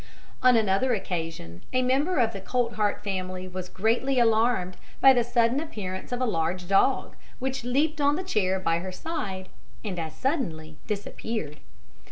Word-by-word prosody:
On 250 -2 +6
another 220 +4 +2
occasion, 165 - -5
a 255 0 +3
member 280 +8 +2
of 230 -3 +2
the 195 - -6
Coltheart 220 -2 0
family 185 -2 -3
was 185 0 -6
greatly 235 +7 +1
alarmed 225 -5 +2 0.2
by 270 0 +8
the 245 -2 +3
sudden 240 +2 +2
appearance 205 - -5
of 245 - -1
a 255 - +1
large 175 -3 -1
dog, 200 +7 +2 0.2
which 265 -1 -3
leaped 290 +5 +1
on 285 +1 +4
the 370 - -3
chair 190 - +1
by 165 -2 +1
her 185 +2 -5
side, 195 - -4 0.4
and 185 -4 -3
as 160 -1 -5
suddenly 160 - -2
disappeared. 205 -5 -4
215 Hz, 160 wpm, -27 LUFS, 185-255 Hz, 0.4 s, by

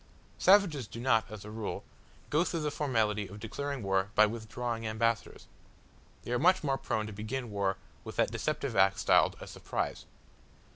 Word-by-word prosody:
Savages 180 - +4
do 115 - -8
not, 120 -3 +3
as 105 -1 -9
a 105 - -8
rule, 110 -1 -4 0.5
go 150 +3 +4
through 170 -2 -2
the 150 -1 -1
formality 110 -8 0
of 100 +3 -10
declaring 140 +4 -4
war 95 0 +1
by 110 - +7
withdrawing 115 +1 -4
ambassadors. 115 +1 -1 0.8
They - - -6
are 125 - +1
much 185 +3 +4
more 135 -2 0
prone 110 -1 -1
to 110 - -7
begin 110 +3 -4
war 100 -1 0 0.3
with - - -8
that - - +2
deceptive - - -2
act 95 0 +4
styled - - +4
"a - - -8
surprise." - - -4
115 Hz, 175 wpm, -31 LUFS, 105-135 Hz, 0.8 s, by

